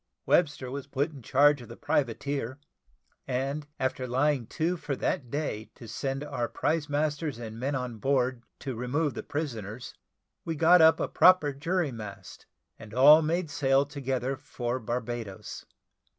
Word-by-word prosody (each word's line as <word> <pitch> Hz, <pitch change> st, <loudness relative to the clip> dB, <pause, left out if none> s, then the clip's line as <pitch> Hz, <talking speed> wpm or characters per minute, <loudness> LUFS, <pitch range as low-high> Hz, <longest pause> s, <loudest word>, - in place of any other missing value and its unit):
Webster 145 Hz, -6 st, +2 dB
was 140 Hz, 0 st, -5 dB
put 140 Hz, +3 st, -1 dB
in 140 Hz, -4 st, -11 dB
charge 145 Hz, +4 st, +4 dB
of 120 Hz, -, -12 dB
the 115 Hz, -, -10 dB
privateer; 140 Hz, -2 st, -1 dB, 0.7 s
and, 135 Hz, +3 st, -2 dB
after 130 Hz, -1 st, -1 dB
lying 130 Hz, -1 st, +1 dB
to 170 Hz, +2 st, -1 dB
for 150 Hz, -4 st, -4 dB
that 130 Hz, -1 st, -2 dB
day 130 Hz, -6 st, -3 dB
to 115 Hz, -, -11 dB
send 135 Hz, +5 st, -3 dB
our 135 Hz, -5 st, -2 dB
prize 160 Hz, -2 st, -1 dB
masters 150 Hz, -1 st, -1 dB
and 115 Hz, -1 st, -7 dB
men 135 Hz, +3 st, -1 dB
on 125 Hz, -3 st, -4 dB
board 130 Hz, -1 st, +1 dB, 0.2 s
to 135 Hz, -, -4 dB
remove 130 Hz, +6 st, -1 dB
the -, -, -5 dB
prisoners, 120 Hz, -6 st, -5 dB, 0.5 s
we 165 Hz, -, -3 dB
got 170 Hz, +3 st, +6 dB
up 160 Hz, 0 st, +6 dB
a -, -, 0 dB
proper 180 Hz, -6 st, +5 dB
jury 165 Hz, +2 st, -1 dB
mast, 105 Hz, -5 st, -9 dB, 0.3 s
and 110 Hz, 0 st, -11 dB
all 150 Hz, +5 st, +8 dB
made 165 Hz, 0 st, -1 dB
sail 140 Hz, -1 st, +3 dB
together 135 Hz, -2 st, -2 dB
for 130 Hz, -3 st, -4 dB
Barbadoes. 120 Hz, -3 st, -5 dB
135 Hz, 155 wpm, -28 LUFS, 120-150 Hz, 0.7 s, all